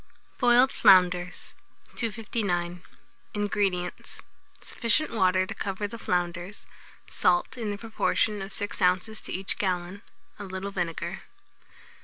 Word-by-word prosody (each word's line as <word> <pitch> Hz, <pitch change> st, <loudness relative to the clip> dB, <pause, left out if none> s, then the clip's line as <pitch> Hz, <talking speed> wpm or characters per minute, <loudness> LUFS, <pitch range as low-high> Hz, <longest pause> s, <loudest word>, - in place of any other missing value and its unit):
BOILED 245 Hz, +1 st, +5 dB
FLOUNDERS. 180 Hz, -1 st, +4 dB, 0.4 s
259. 200 Hz, -6 st, -2 dB, 0.5 s
INGREDIENTS. 200 Hz, -4 st, -2 dB, 0.4 s
Sufficient 235 Hz, +7 st, +1 dB
water 185 Hz, -3 st, +3 dB
to -, -, -6 dB
cover 200 Hz, +1 st, -3 dB
the 230 Hz, +2 st, -9 dB
flounders, 175 Hz, +2 st, -2 dB, 0.4 s
salt 175 Hz, +7 st, +1 dB
in 230 Hz, -4 st, -3 dB
the 205 Hz, -, -3 dB
proportion 215 Hz, -1 st, 0 dB
of 195 Hz, +1 st, -6 dB
6 205 Hz, +1 st, -3 dB
oz. 185 Hz, +4 st, +1 dB
to -, -, -6 dB
each 190 Hz, +1 st, +1 dB
gallon, 185 Hz, 0 st, -2 dB, 0.4 s
a -, -, -5 dB
little 190 Hz, +1 st, -5 dB
vinegar. 175 Hz, 0 st, -3 dB
195 Hz, 115 wpm, -27 LUFS, 180-210 Hz, 0.5 s, BOILED